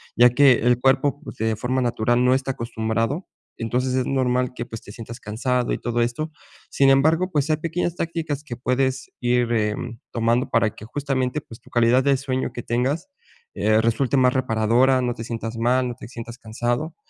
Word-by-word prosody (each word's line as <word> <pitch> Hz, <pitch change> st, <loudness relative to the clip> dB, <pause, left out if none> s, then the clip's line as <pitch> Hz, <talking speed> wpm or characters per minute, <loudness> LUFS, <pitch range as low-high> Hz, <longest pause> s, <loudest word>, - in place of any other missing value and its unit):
ya 120 Hz, +1 st, +7 dB
que 135 Hz, +2 st, +6 dB
el 120 Hz, +1 st, +2 dB
cuerpo, 135 Hz, +2 st, +2 dB
pues, -, -, -9 dB
de 110 Hz, 0 st, 0 dB
forma 130 Hz, +3 st, -1 dB
natural 120 Hz, 0 st, +1 dB
no 125 Hz, 0 st, +4 dB
está 135 Hz, 0 st, 0 dB
acostumbrado. 115 Hz, -, -2 dB, 0.3 s
Entonces, 125 Hz, +3 st, -1 dB
es 130 Hz, -1 st, 0 dB
normal 125 Hz, -1 st, +1 dB
que, 120 Hz, -, -4 dB
pues, 115 Hz, -1 st, -8 dB
te -, -, -12 dB
sientas 115 Hz, +1 st, -9 dB
cansado 125 Hz, +3 st, -1 dB
y -, -, -1 dB
todo 120 Hz, 0 st, -1 dB
esto. 120 Hz, +7 st, -2 dB, 0.4 s
Sin 135 Hz, -1 st, +3 dB
embargo, 160 Hz, +7 st, +3 dB
pues, 150 Hz, -2 st, 0 dB
hay 155 Hz, -, +2 dB
pequeñas 165 Hz, +2 st, -2 dB
tácticas 165 Hz, -4 st, -3 dB
que 130 Hz, -6 st, -6 dB
puedes 130 Hz, +2 st, -1 dB
ir, 120 Hz, -1 st, +1 dB
eh, 105 Hz, -2 st, +1 dB, 0.4 s
tomando 115 Hz, +2 st, +1 dB
para 110 Hz, -, +2 dB
que 110 Hz, -, -10 dB
justamente, 135 Hz, +2 st, -2 dB
pues, 115 Hz, -4 st, -13 dB
tu -, -, -19 dB
calidad 120 Hz, +2 st, +4 dB
de 140 Hz, 0 st, +3 dB
sueño 130 Hz, -2 st, -2 dB
que 120 Hz, -, -6 dB
tengas, 130 Hz, -, -1 dB, 0.4 s
eh, 110 Hz, 0 st, +2 dB
resulte 115 Hz, +4 st, +1 dB
más 130 Hz, -1 st, +4 dB
reparadora, 125 Hz, +1 st, +2 dB
no 125 Hz, -1 st, 0 dB
te 115 Hz, -, -7 dB
sientas 115 Hz, 0 st, -5 dB
mal, 125 Hz, +2 st, +2 dB
no 120 Hz, -, -5 dB
te -, -, -10 dB
sientas 115 Hz, 0 st, -8 dB
cansado. 120 Hz, +7 st, -2 dB
125 Hz, 195 wpm, -23 LUFS, 115-135 Hz, 0.4 s, ya